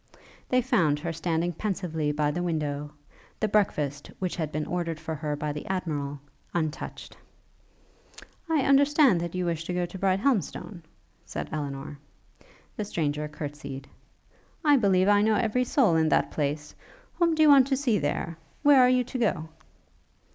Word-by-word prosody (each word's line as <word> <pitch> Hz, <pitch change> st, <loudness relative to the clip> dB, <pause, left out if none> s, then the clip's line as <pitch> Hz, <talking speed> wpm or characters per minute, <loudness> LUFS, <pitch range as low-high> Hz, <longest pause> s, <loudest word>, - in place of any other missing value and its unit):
They 255 Hz, -1 st, +3 dB
found 180 Hz, -, +2 dB
her 165 Hz, +3 st, -4 dB
standing 165 Hz, +1 st, -1 dB
pensively 165 Hz, -5 st, -2 dB
by 150 Hz, 0 st, 0 dB
the 175 Hz, +4 st, -3 dB
window; 150 Hz, -3 st, -2 dB, 0.5 s
the 215 Hz, -, +1 dB
breakfast, 150 Hz, -9 st, 0 dB
which 185 Hz, -2 st, -3 dB
had 160 Hz, -4 st, -3 dB
been 155 Hz, 0 st, -2 dB
ordered 170 Hz, -3 st, -3 dB
for 160 Hz, 0 st, -5 dB
her 150 Hz, -1 st, -3 dB
by 150 Hz, +1 st, -3 dB
the 150 Hz, -, -6 dB
Admiral, 150 Hz, -7 st, -3 dB, 0.4 s
untouched. 155 Hz, -3 st, -4 dB, 1.3 s
'I 315 Hz, -3 st, +3 dB
understand 275 Hz, -, +3 dB
you 180 Hz, -1 st, -1 dB
wish 165 Hz, -2 st, -2 dB
to 180 Hz, -, -3 dB
go 180 Hz, 0 st, 0 dB
to 185 Hz, +2 st, -9 dB
Brighthelmstone?' 195 Hz, -1 st, 0 dB, 0.4 s
said -, -, -6 dB
Elinor. 140 Hz, -1 st, -5 dB, 0.8 s
The 210 Hz, -, -3 dB
stranger 150 Hz, -5 st, -2 dB
courtsied. 145 Hz, -2 st, -7 dB, 0.8 s
'I 290 Hz, -1 st, +6 dB
believe 190 Hz, -5 st, +3 dB
I 205 Hz, 0 st, +5 dB
know 215 Hz, +1 st, +3 dB
every 235 Hz, +3 st, +1 dB
soul 240 Hz, -, +3 dB
in 160 Hz, -1 st, +3 dB
that -, -, +2 dB
place. 150 Hz, 0 st, -2 dB, 0.5 s
Whom 335 Hz, -2 st, +3 dB
do 315 Hz, -, +4 dB
you 305 Hz, -, +6 dB
want 275 Hz, -3 st, +7 dB
to 270 Hz, -1 st, +1 dB
see 245 Hz, -7 st, +1 dB
there? 160 Hz, +3 st, -2 dB, 0.2 s
Where 285 Hz, -3 st, +7 dB
are 250 Hz, -, +6 dB
you 250 Hz, 0 st, +3 dB
to 255 Hz, +1 st, -5 dB
go?' 160 Hz, -9 st, 0 dB
170 Hz, 160 wpm, -27 LUFS, 150-220 Hz, 1.3 s, want